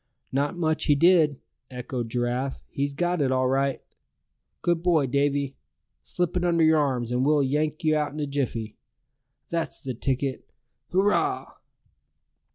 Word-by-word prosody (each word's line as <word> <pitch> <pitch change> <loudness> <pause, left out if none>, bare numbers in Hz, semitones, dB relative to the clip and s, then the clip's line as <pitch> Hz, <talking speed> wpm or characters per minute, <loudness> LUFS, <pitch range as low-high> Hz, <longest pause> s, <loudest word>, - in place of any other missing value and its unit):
"Not 145 +5 -1
much 160 -2 0
he 145 - +4
did!" 160 -3 +4 0.3
echoed 125 -2 -5
Giraffe; 125 +3 -1
"he's 140 0 -2
got 175 +1 0
it 135 -2 +2
all 130 0 +2
right! 135 +1 0 0.8
Good 175 -1 +1
boy, 170 -5 +3
Davy! 140 +1 0 0.4
Slip 175 0 -2
it 180 - 0
under 170 -2 +3
your 160 0 +5
arms, 125 -5 0
and 125 +1 +1
we'll 145 0 +3
yank 150 +3 -1
you 155 -1 +3
out 150 -1 0
in 150 - -7
a 150 - 0
jiffy! 125 -6 -3 0.7
That's 165 -1 -3
the 130 -2 -3
ticket! 135 +2 -2 0.4
Hurrah!" 195 +3 +1
145 Hz, 150 wpm, -26 LUFS, 130-160 Hz, 0.8 s, your